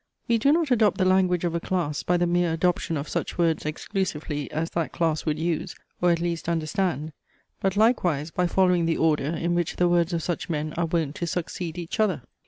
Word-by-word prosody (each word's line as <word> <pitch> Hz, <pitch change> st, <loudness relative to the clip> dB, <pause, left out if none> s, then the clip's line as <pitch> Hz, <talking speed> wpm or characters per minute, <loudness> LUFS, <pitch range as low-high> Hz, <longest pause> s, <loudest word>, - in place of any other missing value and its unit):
We 230 Hz, -1 st, +3 dB
do 275 Hz, +6 st, +4 dB
not 320 Hz, -3 st, +2 dB
adopt 215 Hz, -5 st, +3 dB
the 185 Hz, -, +2 dB
language 185 Hz, -2 st, +3 dB
of 170 Hz, -, -1 dB
a 170 Hz, -, 0 dB
class 165 Hz, -5 st, -2 dB
by 175 Hz, -, +1 dB
the 175 Hz, -, +2 dB
mere 175 Hz, -1 st, +1 dB
adoption 165 Hz, -1 st, 0 dB
of 140 Hz, +2 st, -4 dB
such -, -, -3 dB
words 165 Hz, -3 st, +1 dB
exclusively, 155 Hz, -4 st, -3 dB
as 160 Hz, +2 st, -3 dB
that 170 Hz, -2 st, -2 dB
class 160 Hz, -2 st, -1 dB
would 155 Hz, 0 st, +1 dB
use, 165 Hz, 0 st, -2 dB, 0.3 s
or 180 Hz, -, +4 dB
at 170 Hz, -1 st, +2 dB
least 170 Hz, -1 st, -2 dB
understand; 160 Hz, -2 st, -1 dB, 0.5 s
but 195 Hz, 0 st, 0 dB
likewise 175 Hz, -, +2 dB
by 180 Hz, 0 st, +1 dB
following 180 Hz, -2 st, +3 dB
the 165 Hz, -, +1 dB
order, 155 Hz, -3 st, +2 dB
in 170 Hz, +1 st, -1 dB
which 175 Hz, -2 st, -1 dB
the 180 Hz, -, +3 dB
words 175 Hz, 0 st, +2 dB
of 165 Hz, -2 st, -1 dB
such 175 Hz, -1 st, -3 dB
men 155 Hz, -1 st, -2 dB
are 170 Hz, 0 st, 0 dB
wont 160 Hz, -4 st, -1 dB
to 170 Hz, -, -2 dB
succeed 175 Hz, 0 st, -4 dB
each 175 Hz, +5 st, -5 dB
other. 190 Hz, -, +1 dB
170 Hz, 215 wpm, -25 LUFS, 160-180 Hz, 0.5 s, do